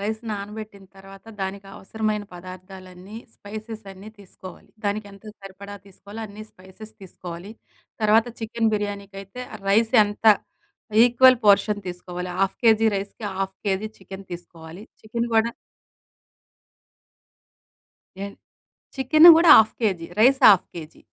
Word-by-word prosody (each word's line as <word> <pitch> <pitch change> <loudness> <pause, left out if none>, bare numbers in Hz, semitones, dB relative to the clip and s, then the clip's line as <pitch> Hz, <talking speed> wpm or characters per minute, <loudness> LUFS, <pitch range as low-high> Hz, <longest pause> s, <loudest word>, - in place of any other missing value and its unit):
Rice 215 +2 -3
నానబెట్టిన 210 0 -8
తర్వాత, 195 +1 -15 0.2
దానికి 195 +1 -5
అవసరమైన 215 +1 -3
పదార్థాలన్నీ 185 +2 -12 0.2
స్పైసెస్ 215 +1 -9
అన్నీ 195 +3 -13
తీసుకోవాలి. 185 -1 -14 0.2
దానికి 205 +1 -2
ఎంత 200 +2 -17 0.2
సరిపడా 195 +1 -11
తీసుకోవాలో 200 +3 -12
అన్నీ 210 +1 -11
స్పైసెస్ 190 +4 -15
తీసుకోవాలి. 180 0 -10 0.5
తర్వాత 215 +2 +4
చికెన్ 225 0 -1
బిర్యానీకైతే 200 +2 -6 0.3
రైస్ 220 +3 +2
ఎంత 205 +2 -5 0.8
ఈక్వల్ 255 +1 +5
పోర్షన్ 205 +1 +3
తీసుకోవాలి. 180 0 -7
½ 195 0 0
కేజీ 225 -1 +4
రైస్‍కి, 200 +2 -7
½ 195 0 -3
కేజీ 195 +2 -1
చికెన్ 195 0 -11
తీసుకోవాలి. 170 +2 -11 0.2
చికెన్ 235 +2 -4
కూడా 225 +1 +2 2.7
ఎన్ 200 - -8 0.6
చికెన్ 310 +6 +6
కూడా 335 0 +5
half 220 0 +4
KG. 185 -7 -1
Rice 265 +4 +4
half 195 -4 +5
KG. 160 -2 -10
200 Hz, 115 wpm, -23 LUFS, 190-220 Hz, 2.7 s, చికెన్